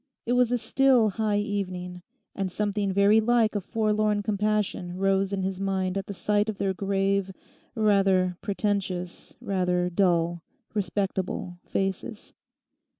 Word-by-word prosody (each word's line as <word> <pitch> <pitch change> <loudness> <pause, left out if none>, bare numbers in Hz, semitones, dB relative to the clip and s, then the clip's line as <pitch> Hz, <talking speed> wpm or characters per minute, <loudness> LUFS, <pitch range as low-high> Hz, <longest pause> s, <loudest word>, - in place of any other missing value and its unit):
It 240 - 0
was 245 -1 +3
a 245 - +2
still, 245 0 +3
high 210 +1 0
evening, 185 -4 -3 0.3
and 195 -2 -3
something 205 0 -1
very 200 +3 +5
like 230 -1 +3
a 205 - 0
forlorn 215 0 0
compassion 205 -3 -1
rose 195 0 +1
in 195 -1 -1
his 190 0 -3
mind 190 -1 -1
at 195 0 -4
sight 210 +2 +1
of 210 - -4
their 195 -1 0
grave, 195 0 0 0.4
rather 195 -4 +3
pretentious, 195 -3 -3
rather 180 -2 0
dull, 170 -2 +1 0.3
respectable 190 -2 -2
faces. 195 +3 -3
195 Hz, 130 wpm, -26 LUFS, 185-210 Hz, 0.4 s, very